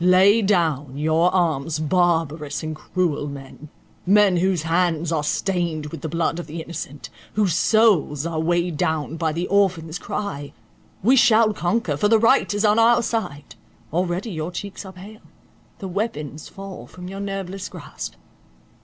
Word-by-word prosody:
Lay 190 +5 +6
down 160 -9 +1
your 160 +4 +2
arms, 160 -4 0
barbarous 160 -3 0
and 155 0 -4
cruel 155 -2 -1
men—men 175 +7 -1
whose 180 -2 +1
hands 165 -1 +1
are 155 -2 0
stained 170 -2 -1
with 165 - -7
the 160 - -4
blood 165 +1 -1
of 175 - -6
the 165 +2 -6
innocent, 145 -5 -7 0.2
whose 200 -5 +2
souls 180 -7 +3
are 165 -1 -2
weighed 170 0 0
down 160 0 -1
by 160 -1 0
the 170 +3 -2
orphan's 180 -5 +1
cry! 145 -9 -5 0.5
We 250 +6 +5
shall 230 -3 +5
conquer, 175 -5 -1
for 205 - +2
the 225 +1 +5
right 230 +3 +3
is 205 +1 0
on 210 +2 +4
our 235 +1 +5
side; 150 -13 -3 0.4
already 180 +5 -1
your 160 0 -4
cheeks 200 +2 -6
are 190 - -10
pale—the 195 0 -13
weapons 175 - -4
fall 195 -1 -9
from 180 0 -10
your 195 +1 -7
nerveless 195 -1 -4
grasp. 65 -1 -8
175 Hz, 155 wpm, -22 LUFS, 155-195 Hz, 0.5 s, Lay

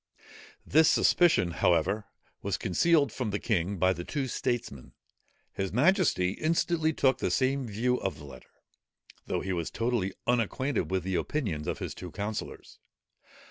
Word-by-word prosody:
This 160 0 +5
suspicion, 165 - +4
however, 90 +5 +1 0.4
was 100 -3 -2
concealed 140 - +2
from 125 -2 -3
the 100 - -1
king 100 -3 -1
by 95 +1 +3
the 85 0 -6
two 140 - -3
statesmen. 120 - -3 0.6
His 95 -1 -3
majesty 140 - +3
instantly 160 - 0
took 135 -3 +2
the - - 0
same 130 0 0
view 120 +4 0
of 95 - -3
the 75 - -11
letter, 65 -2 -13 0.8
though - - -1
he 95 - -2
was 85 -2 -2
totally 115 -5 -1
unacquainted 125 - 0
with 95 -2 -1
the 95 +1 -3
opinions 90 - -2
of - - -2
his - - -5
two 90 - -8
councillors. 100 +6 -6
110 Hz, 150 wpm, -29 LUFS, 90-135 Hz, 0.8 s, This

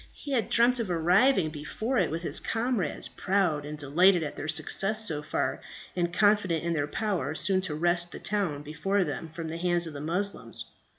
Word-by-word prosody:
He 285 - -8
had 245 -4 0
dreamt 245 +1 +4
of 225 -5 -2
arriving 180 - +3
before 215 - -2
it 180 - +1
with 165 +3 -4
his - - +2
comrades, 225 - -1
proud 180 -7 0
and 150 0 -6
delighted 170 +5 +3
at 150 - -5
their 145 - -5
success 205 +7 +1
so 150 -2 -3
far, 155 - -2 0.3
and 175 -1 0
confident 185 -4 +2
in 170 0 -1
their 145 -2 -1
power 195 -2 -2
soon 190 +3 +3
to 175 -5 -3
wrest 175 +2 +2
the - - -7
town 185 -9 -2
before 185 +7 -1
them 165 -2 -5
from 165 +1 -7
the 165 - -5
hands 175 0 +1
of 160 - -6
the 140 - -7
Moslems. 185 +6 -1
175 Hz, 195 wpm, -28 LUFS, 155-200 Hz, 0.3 s, dreamt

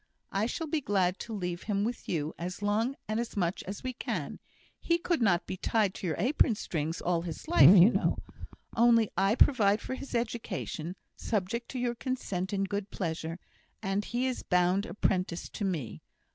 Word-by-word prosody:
I 200 +3 +1
shall 325 +6 -3
be 310 0 -1
glad 190 -5 +1
to 230 - -6
leave 180 -3 -3
him 205 -1 -1
with 235 +3 -4
you 155 -2 -1
as 180 +4 -5
long 220 +6 +1
and 215 +1 -1
as 235 -2 -4
much 175 -2 0
as 195 +1 -6
we 255 0 -3
can; - - -4 0.4
he 335 - +2
could 340 -3 -1
not 185 -6 +3
be 185 - -5
tied 210 -1 +1
to 190 - -5
your 160 - 0
apron 245 - +3
strings 165 -4 -3
all 175 -1 +1
his 170 -2 -7
life, 160 +8 +8
you 185 +6 +8
know. - - +1 0.6
Only 230 -2 +5
I 195 +4 +3
provide 215 -7 +4
for - - -5
his 260 -1 -6
education, 215 -7 -3 0.2
subject 225 +2 -2
to 255 - -4
your 245 -1 0
consent 225 -7 -3
and 195 -1 0
good 200 +1 -3
pleasure, 165 -2 -3 0.5
and 195 +1 0
he 240 +4 -1
is 255 -1 -1
bound 180 +4 +2
apprentice 185 -5 -1
to - - -5
me. 145 - -3
200 Hz, 185 wpm, -30 LUFS, 180-235 Hz, 0.6 s, life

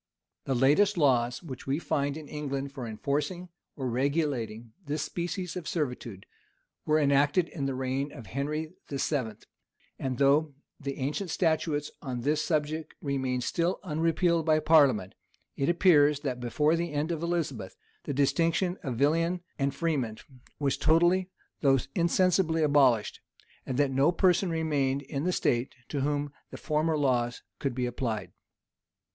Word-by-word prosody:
The 135 - 0
latest 150 +11 +4
laws 125 -5 +2
which 135 -7 -8
we 135 +2 +1
find 145 -3 -1
in 155 -2 -9
England 140 -2 -4
for 130 -4 -6
enforcing 150 - -2 0.3
or 135 -2 -3
regulating 125 -4 -1
this 150 -1 -2
species 175 +3 -4
of 180 -4 -5
servitude, 125 - -3 0.6
were 155 0 +4
enacted 145 +4 +3
in 140 -4 -3
the 135 - -2
reign 130 +2 -2
of 120 -7 -10
Henry 150 - -3 0.2
VII. 140 -4 -1 0.7
And 130 -2 -2
though 140 +2 +3 0.2
the 140 -1 -5
ancient 150 +8 -2
statutes 160 -3 0
on 125 -5 -4
this 150 +4 +1
subject 155 -1 -2
remain 130 -3 -1
still 170 +8 0
unrepealed 165 0 +1
by 155 -1 +3
parliament, 140 - +4 0.4
it 140 - 0
appears 150 -5 +4
that 130 -4 -3
before 150 +6 +1
the 170 -1 -2
end 150 +3 -1
of 165 -2 -3
Elizabeth, 155 - -2 0.3
the - - -2
distinction 165 +6 +1
of 130 -4 -3
villain 165 +7 +1 0.2
and 140 0 0
freeman 140 -9 -1 0.4
was 140 -2 0
totally, 175 +4 +3 0.3
though 135 -2 +4 0.2
insensibly 170 -1 +2
abolished, 135 -7 +3 0.5
and 130 - -2
that 140 -1 +2
no 135 +5 +3
person 180 +1 +3
remained 145 -4 0
in 140 +2 -4
the 180 - +2
state, 120 -7 0
to 145 - -2
whom 145 0 -1 0.2
the - - -8
former 155 0 0
laws 125 -4 0 0.2
could 135 -4 -2
be 125 -1 -1
applied. 120 -3 -3
145 Hz, 150 wpm, -29 LUFS, 135-160 Hz, 0.7 s, latest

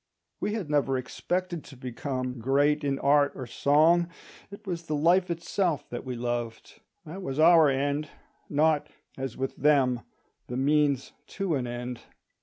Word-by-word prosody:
We 210 - -1
had 205 -8 -3
never 145 -3 +1
expected 175 +6 -3
to 135 - -13
become 130 0 -4
great 145 +5 +2
in 140 -1 0
art 145 0 +3
or 130 - -6
song; 160 +7 +3 0.4
it 200 +2 -12
was 170 -3 -5
the 150 - -1
life 175 +5 +3
itself 170 -1 -1
that 120 - -5
we 130 -1 -5
loved; 120 -1 -4 0.2
that 170 +5 -7
was 135 -7 -4
our 160 -1 +7
end—not, 145 +2 -1 0.3
as 130 -3 -5
with 135 0 -3
them, 135 -4 +3 0.5
the 125 - -4
means 140 -1 +2 0.3
to 195 -4 0
an 130 -4 -1
end. 120 0 -5
145 Hz, 150 wpm, -27 LUFS, 130-165 Hz, 0.5 s, our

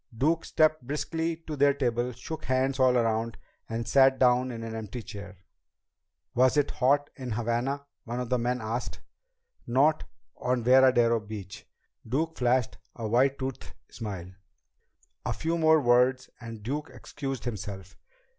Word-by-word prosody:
Duke 160 +6 +1
stepped 155 -1 +2
briskly 160 +5 -2
to 155 - -4
their 140 0 +4
table, 120 -2 0
shook 155 +6 -7
hands 130 +1 +1
all 130 -1 +5
around, 115 0 0 0.3
and 115 0 -3
sat 135 -1 +5
down 125 0 +3
in 115 -2 -6
an 115 0 -5
empty 110 +1 -6
chair. 100 -3 -9 1.0
"Was 130 +3 +3
it 145 -1 +2
hot 145 +3 +2
in 125 -3 -4
Havana?" 120 +5 -1 0.2
one 120 +1 -4
of 125 -2 -4
the 125 -1 +1
men 125 +1 -1
asked. 115 +3 -4 0.7
"Not 145 +6 +3 0.3
on 125 -1 -1
Veradero 125 -2 +5
Beach." 105 -3 -9 0.4
Duke 160 +6 -1
flashed 125 -1 +1 0.2
a 115 -2 -4
white 130 +5 +3
toothed 135 -1 -6 0.2
smile. 95 -6 -6 0.9
A - - -1
few 165 +1 -1
more 160 -1 +5
words 125 0 +3
and 115 -3 -9
Duke 145 +6 -3
excused 135 -4 -6
himself. 100 -4 -6
125 Hz, 145 wpm, -28 LUFS, 115-140 Hz, 1.0 s, all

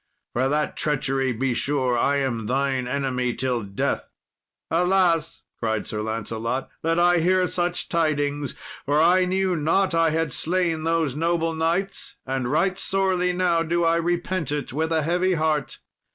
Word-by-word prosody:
For 130 +2 +1
that 150 +1 0
treachery, 135 -3 0
be 125 +2 -1
sure 130 -1 0
I 140 +4 +2
am 125 -6 -1
thine 130 0 0
enemy 125 -2 -1
till 125 -1 -1
death." 100 -1 -2 0.6
"Alas!" 175 -2 +2 0.2
cried 110 -2 -1
Sir 105 - -3
Lancelot, 115 +3 -3
"that 165 +1 0
I 175 0 +4
hear 185 +2 +3
such 175 0 -1
tidings, 145 -4 0 0.3
for 145 +2 +1
I 180 +3 +5
knew 185 0 0
not 165 +5 +1
I 165 -1 +3
had 160 -3 -1
slain 170 -2 0
those 165 -5 +1
noble 165 +1 0
knights, 170 +5 -2
and 130 -2 -2
right 180 +5 +1
sorely 190 -2 +1
now 180 -2 +1
do 170 +1 0
I 165 0 +3
repent 175 -2 -1
it 145 -4 -3
with 160 +3 -1
a 160 -1 +2
heavy 180 +3 +1
heart. 155 -3 -1
160 Hz, 155 wpm, -24 LUFS, 135-175 Hz, 0.6 s, I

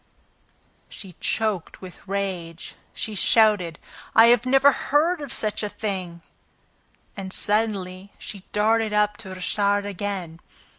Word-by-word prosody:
She 190 -3 -9
choked 215 -6 -1
with 185 -2 -11
rage. 185 -4 -4 0.2
She 220 - -4
shouted: 205 -5 +3 0.4
"I 235 +1 +8
never 270 +2 +5
heard 310 +5 +1
of 285 -4 -6
such 215 -1 0
a 210 - -2
thing!" 185 -5 -5 0.9
And, 190 -2 -6
suddenly, 200 -3 -1
she 200 -3 -7
darted 220 +1 +2
up 210 0 +2
to 215 -4 -9
Richard 200 +2 +1
again. 195 -4 -4
205 Hz, 115 wpm, -24 LUFS, 185-220 Hz, 0.9 s, I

